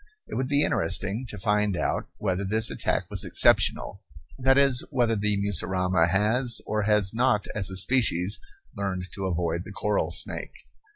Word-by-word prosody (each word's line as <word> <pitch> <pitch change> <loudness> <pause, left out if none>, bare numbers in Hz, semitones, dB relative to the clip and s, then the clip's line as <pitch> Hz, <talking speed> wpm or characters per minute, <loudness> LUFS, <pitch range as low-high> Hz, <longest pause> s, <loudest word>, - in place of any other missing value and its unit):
It - - -11
would 130 - -2
be 145 +1 +2
interesting 100 +8 0
to 105 - -7
find 105 -1 0
out - - -2
whether 95 -1 -2
this 110 +3 0
attack - - -2
was - - +1
exceptional, 95 - +2 0.4
that 130 +1 +3
is, 135 -3 +3
whether 120 -5 +1
the 105 0 0
mussurama 90 -3 0
has 110 +6 +2
or 110 0 -1
has 105 -2 +1
not 115 -3 +1
as 100 -2 +3
a 95 - -5
species 100 -3 +3 0.4
learned 95 -2 -4
to 95 -1 -4
avoid 85 -1 -2
the 100 - -11
coral 105 +1 -1
snake. - - 0
105 Hz, 165 wpm, -25 LUFS, 95-115 Hz, 0.4 s, that